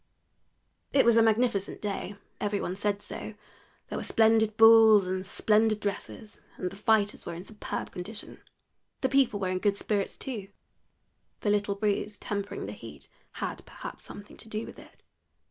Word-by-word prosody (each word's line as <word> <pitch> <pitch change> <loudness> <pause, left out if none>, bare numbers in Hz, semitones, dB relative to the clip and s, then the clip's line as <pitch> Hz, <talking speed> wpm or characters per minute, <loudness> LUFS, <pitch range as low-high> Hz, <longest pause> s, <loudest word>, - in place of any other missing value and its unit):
It 275 - +5
was 235 -1 +5
a 230 - +6
magnificent 225 -2 +1
day 205 -1 -4 0.2
every 205 -1 -1
one 180 - -3
said 205 0 -1
so; 220 - -7 0.5
there - - -4
were - - -5
splendid 220 -1 +3
bulls 225 -2 +8
and 185 0 -2
splendid 215 +2 +2
dresses, 205 +1 -5 0.2
and 180 - -3
the - - -10
fighters 210 0 +1
were - - -4
in 175 - -7
superb 210 +1 -5
condition. 205 +4 -8 0.6
The 260 - +1
people 260 -6 +3
were 190 -2 -1
in 185 0 -1
good 200 0 +1
spirits 205 -1 -2
too 220 -7 -5 0.9
the 205 - +1
little 205 -1 +1
breeze 205 0 -1
tempering 200 -1 -4
the - - -5
heat - - -11 0.2
had, - - -5
perhaps, - - -9
something 205 - -11
to 220 - -12
do 215 +1 -3
with - - -11
it. - - -17
210 Hz, 165 wpm, -28 LUFS, 200-220 Hz, 0.9 s, bulls